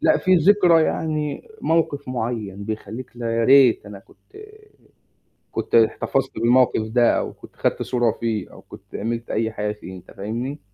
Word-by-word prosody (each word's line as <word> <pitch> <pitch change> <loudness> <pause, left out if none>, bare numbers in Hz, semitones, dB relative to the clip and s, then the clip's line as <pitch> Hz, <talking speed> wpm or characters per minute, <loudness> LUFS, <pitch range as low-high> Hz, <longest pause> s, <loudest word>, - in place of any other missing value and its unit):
لأ. 315 0 +3
في 185 -1 +3
ذكرى 175 -1 +5
يعني 155 -2 -2
موقف 155 -4 0
معيّن، 110 -5 -4
بيخلِّيك 110 +3 -6
لأ، 115 -1 -2
يا 115 - +1
ريت 130 -4 +5
أنا 100 -1 -9
كنت 400 - -22 1.2
كنت - - -4
احتفظت 120 +3 +2
بالمَوقِف 120 0 +3
ده، 120 -1 +3
أو - - -3
كنت - - -16
خَدت - - -1
صورة 120 -3 +1
فيه، 110 -4 -3
أو - - -13
كنت - - -15
عملت 115 +2 -4
أي 110 0 -1
حاجة 105 -1 -2
فيه، 95 -3 -10
أنت 90 0 -14
فاهمني؟ 120 +8 -5
120 Hz, 160 wpm, -22 LUFS, 110-145 Hz, 1.2 s, ذكرى